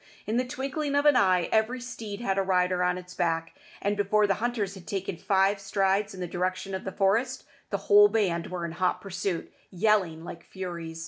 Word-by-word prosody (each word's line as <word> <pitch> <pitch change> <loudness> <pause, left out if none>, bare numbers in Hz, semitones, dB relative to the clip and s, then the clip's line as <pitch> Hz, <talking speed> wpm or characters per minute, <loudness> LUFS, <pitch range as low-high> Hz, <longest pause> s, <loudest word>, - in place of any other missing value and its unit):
In 220 +3 -1
the 250 0 0
twinkling 280 +2 -3
of 285 +1 +2
an 295 -2 +6
eye 185 -5 +3
every 220 +3 +2
steed 230 -4 -7
had 195 -4 0
a - - +3
rider 180 -1 +1
on 180 0 +1
its 180 0 -10
back, 165 -1 -1 0.3
and 205 +1 +1
before 205 +1 +2
the 200 - +2
hunters 225 -5 -1
had 190 -3 -12
taken 195 -2 -3
five 195 +3 +2
strides 195 +1 0
in - - -10
the 180 - -2
direction 185 +2 -2
of 190 - -4
the 190 - -3
forest, 225 +8 +1 0.2
the 200 - -1
whole 205 0 +8
band 195 -6 0
were 180 -2 -4
in 170 - -4
hot 180 +2 0
pursuit, 190 -3 -4 0.2
yelling 185 -4 +1
like 170 0 -9
furies. 170 -3 -6
195 Hz, 205 wpm, -27 LUFS, 180-215 Hz, 0.3 s, whole